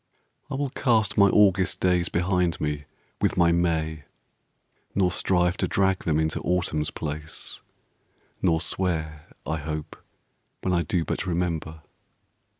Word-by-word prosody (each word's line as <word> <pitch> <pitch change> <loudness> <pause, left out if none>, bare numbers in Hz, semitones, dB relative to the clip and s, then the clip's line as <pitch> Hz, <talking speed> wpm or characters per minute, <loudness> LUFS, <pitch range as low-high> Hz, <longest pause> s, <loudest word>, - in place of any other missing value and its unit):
I 140 - -3
will 140 -1 -2
cast 110 -7 +2
My 100 -1 +6
August 95 -2 +3
days 90 -2 +2
behind 90 -1 +1
me 75 -1 -2 0.4
with - - +1
my 85 -1 +5
May, 80 -3 0 0.9
Nor 95 -2 +3
strive 90 0 +2
to - - 0
drag 95 -1 +1
them 80 -2 +2
into 80 0 0
Autumn's 85 -4 0
place, 75 0 -5 0.8
Nor 80 -3 +2
swear 80 -5 -2 0.2
I 80 - -1
hope 75 0 -5 0.7
when 90 - 0
I 85 - +3
do 85 +1 -1
but 95 - -2
remember. 85 -3 -2
85 Hz, 135 wpm, -26 LUFS, 80-95 Hz, 0.9 s, My